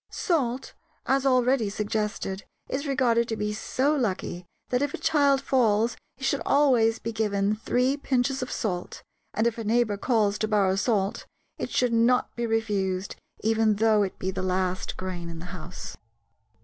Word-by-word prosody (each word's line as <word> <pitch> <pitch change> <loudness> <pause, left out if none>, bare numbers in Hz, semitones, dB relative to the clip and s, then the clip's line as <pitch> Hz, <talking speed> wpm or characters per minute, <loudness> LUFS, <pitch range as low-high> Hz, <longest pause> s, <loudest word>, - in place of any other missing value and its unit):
Salt, 265 -7 -1 0.3
as 270 +1 +2
already 255 -3 +3
suggested, 205 -2 -2 0.2
is 280 +3 -3
regarded 240 -4 +2
to 225 - -2
be 210 -1 -2
so 265 +7 0
lucky 185 -8 -2 0.2
that 250 +1 +1
if 285 0 -1
a - - -7
child 285 -3 +3
falls, 230 -4 +2 0.2
it 265 - -12
should 275 +1 +1
always 250 -6 +3
be 230 - -4
given 210 -2 0
three 250 +5 +1
pinches 265 -1 0
of 255 - -4
salt, 180 -5 -3 0.3
and 220 - +1
if 235 0 0
a - - -3
neighbor 220 -1 +1
calls 210 -3 +1
to 215 - 0
borrow 200 -3 +2
salt, 200 -1 0 0.3
it - - -3
should 250 -2 +1
not 235 +2 +2
be 235 0 -2
refused, 200 -4 -1 0.3
even 220 -1 +2
though 215 0 +3
it 195 -2 -2
be 190 - -2
the 190 0 -4
last 185 0 -1
grain 180 -2 -5
in 165 - -7
the 165 - -8
house. 180 0 -8
225 Hz, 170 wpm, -26 LUFS, 200-250 Hz, 0.3 s, already